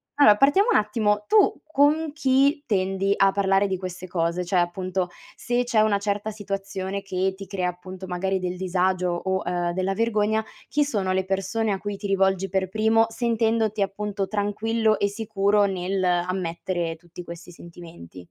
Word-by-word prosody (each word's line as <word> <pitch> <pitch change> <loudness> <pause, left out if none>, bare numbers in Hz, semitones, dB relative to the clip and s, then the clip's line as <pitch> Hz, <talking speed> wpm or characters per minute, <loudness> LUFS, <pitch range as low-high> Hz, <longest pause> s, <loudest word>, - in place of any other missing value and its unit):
allora, 250 -8 +7
partiamo 380 - +4
un - - +5
attimo. 210 -1 0
Tu 425 -1 +3
con 295 +2 +3
chi 280 +1 +2
tendi 195 -1 +1
a 195 0 +4
parlare 195 0 +2
di 190 -1 -2
queste 185 0 -7
cose? 170 0 -1
Cioè, 180 +1 0
appunto, 180 +1 -1 0.3
se 245 0 -1
c'è 230 -3 +2
una 210 -2 +3
certa 205 +1 -2
situazione 195 -1 -4
che 190 -1 -1
ti 195 0 -9
crea 185 -2 -2
appunto 185 +1 -9
magari 190 +1 -1
del 180 0 -3
disagio 185 0 0
o, 190 +2 -2
ehm, 175 -1 -1
della 190 +1 -1
vergogna, 220 0 +1 0.3
chi 295 0 +2
sono 205 -9 -1
le 190 0 0
persone 195 +3 -1
a 195 - 0
cui 205 -1 -5
ti 205 - -5
rivolgi 195 -1 +1
per 190 0 0
primo 220 +2 +3
sentendoti 225 -2 0
appunto 200 0 -2
tranquillo 215 +1 0
e 200 - +2
sicuro 205 -1 +1
nell'ammettere 180 -2 -1
tutti 175 +1 -11
questi 170 +1 -10
sentimenti? 170 - -12
195 Hz, 165 wpm, -24 LUFS, 185-215 Hz, 0.3 s, allora